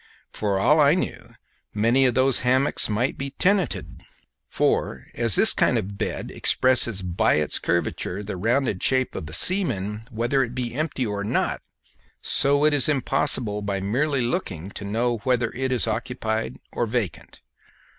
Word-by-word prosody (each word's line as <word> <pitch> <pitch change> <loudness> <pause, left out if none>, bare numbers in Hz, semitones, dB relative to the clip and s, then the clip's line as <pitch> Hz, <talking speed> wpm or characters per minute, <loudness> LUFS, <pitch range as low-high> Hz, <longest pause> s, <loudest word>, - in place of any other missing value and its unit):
For 100 -2 -1
all 150 +11 +3
I 145 +2 +5
knew 185 - -5 0.4
many 120 +5 +3
of 125 - 0
those 130 -1 +3
hammocks 130 +1 +1
might 115 +5 -1
be 135 0 -3
tenanted; 190 -4 0 0.5
for - - -1
as 115 -4 +2
this - - +8
kind - - +2
of 100 +2 -4
bed - - -4
expresses 120 -6 +1
by 90 -1 +1
its 75 -2 0
curvature 90 +3 -2
the 100 -1 -5
rounded 115 +1 0
shape 130 -1 +1
of 75 - -6
a - - -10
seaman, 105 - 0
whether 120 +3 0
it 120 -1 -6
be 125 -2 -3
empty 145 -2 -2
or 100 -2 -3
not, 105 - -1 0.6
so 145 +2 +2
it 155 - +3
is 145 0 +4
impossible 130 -6 +1
by 100 -1 -2
merely 130 +7 0
looking 100 - -3
to - - -8
know 115 +4 -1
whether 120 0 0
it 130 +1 -2
is 125 - +1
occupied 110 0 -3
or 120 - -2
vacant. 110 -7 -4
120 Hz, 160 wpm, -23 LUFS, 105-135 Hz, 0.6 s, this